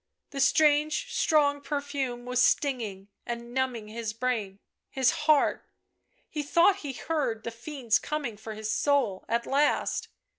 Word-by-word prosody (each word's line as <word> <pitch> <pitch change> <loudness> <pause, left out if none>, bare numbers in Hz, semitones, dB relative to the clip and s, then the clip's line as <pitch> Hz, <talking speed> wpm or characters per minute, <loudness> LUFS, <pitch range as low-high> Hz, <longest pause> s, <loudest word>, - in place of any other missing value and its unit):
The 275 - -5
strange 300 - +3
strong 285 -3 +3
perfume 280 -4 -3
was 250 0 +1
stinging 220 -9 0
and 235 0 -6
numbing 255 -4 -1
his 220 0 -4
brain, 225 -5 -2 0.3
his 265 -2 +2
heart; 310 -3 +2 0.6
he 300 - -4
thought 340 +7 +4
he 290 -8 -6
heard 260 -7 -2
the 235 - -4
fiends 240 -1 -1
coining 280 -8 -4
for 220 +1 -8
his 215 0 -3
soul 265 -10 +1
— - - -31
at 235 +1 0
last. 290 +2 +1
260 Hz, 145 wpm, -28 LUFS, 230-295 Hz, 0.6 s, thought